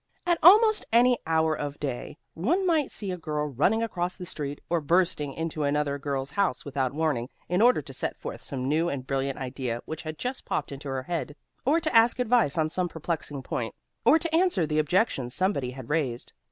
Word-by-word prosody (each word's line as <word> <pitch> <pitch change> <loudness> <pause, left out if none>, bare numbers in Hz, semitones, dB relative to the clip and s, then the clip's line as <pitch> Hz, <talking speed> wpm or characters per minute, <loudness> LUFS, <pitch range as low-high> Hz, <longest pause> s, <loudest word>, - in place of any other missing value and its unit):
At 345 -1 +2
almost 430 +5 +7
any 240 +1 +5
hour 160 -1 +2
of 145 -1 -5
day, 135 0 -4 0.2
one 325 - +1
might 320 -6 +2
see 200 -3 -2
a 180 - -5
girl 150 -2 -2
running 155 - +1
across 180 -5 -2
the 180 - -7
street, 145 -4 -4
or 170 -1 0
bursting 165 -2 +1
into 160 0 -4
another 145 0 0
girl's 140 -1 -3
house 200 -10 0
without 135 -3 -1
warning, 145 -5 -1 0.2
in 180 +3 +1
order 240 -9 +5
to 135 - -9
set - - -3
forth - - -7
some 130 -2 -4
new 160 +4 +2
and 135 -4 -4
brilliant 135 0 -1
idea 125 -2 -3
which 160 +1 -6
had 155 -2 -6
just 255 +1 -4
popped 145 - -3
into 140 +1 -7
her 130 -1 -3
head, 160 -1 -4 0.3
or 310 +4 +4
to 315 -6 -2
ask 230 +1 +6
advice 240 - +2
on 155 -1 +2
some 175 +3 -2
perplexing 155 -4 -4
point, - - -3 0.3
or - - +6
to 325 0 -1
answer 345 - +3
the 155 0 0
objections 150 - +1
somebody 185 -10 0
had 130 -1 -9
raised. 140 -6 -2
155 Hz, 205 wpm, -27 LUFS, 140-210 Hz, 0.3 s, almost